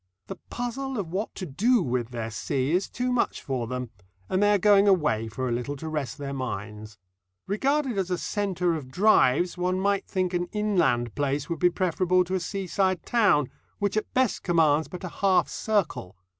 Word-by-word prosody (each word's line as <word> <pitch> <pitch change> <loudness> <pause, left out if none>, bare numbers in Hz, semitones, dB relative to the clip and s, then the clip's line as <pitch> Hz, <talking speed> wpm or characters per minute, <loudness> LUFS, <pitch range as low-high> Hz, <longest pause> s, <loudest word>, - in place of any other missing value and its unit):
The - - -7
puzzle 255 +2 -4
of 185 -6 -4
what 200 +5 -3
to 190 - -5
do 210 - +2
with 125 -4 -2
their 115 -2 -5
sea 130 +4 -1
is 180 +3 +1
too 250 +1 -2
much 250 - 0
for 130 -4 -2
them, 125 -1 -4 0.4
and 185 - +1
they 205 0 +4
are - - +4
going 200 +1 +5
away 150 - +2
for 130 +4 -4
a - - -2
little 125 +4 -2
to 160 +3 -7
rest 150 -4 -3
their 140 -1 -5
minds. 105 -4 -6 0.5
Regarded 265 +2 0
as 185 -1 -1
a 180 - 0
centre 185 -3 -1
of 150 -5 -5
drives 180 -1 +3
one 180 +1 0
might 200 0 0
think 185 -1 -1
an 175 0 0
inland 175 - +1
place 145 +2 -1
would 165 - -2
be 180 - +5
preferable 185 +1 +1
to 180 +1 -6
a 190 - +1
seaside 185 -2 -1
town, 190 - +3 0.3
which 200 0 -1
at 215 - -2
best 255 -3 +2
commands 160 -3 +2
but 180 - -9
a 180 - -4
half 195 -2 +4
circle. 200 - -2
180 Hz, 195 wpm, -26 LUFS, 135-200 Hz, 0.5 s, going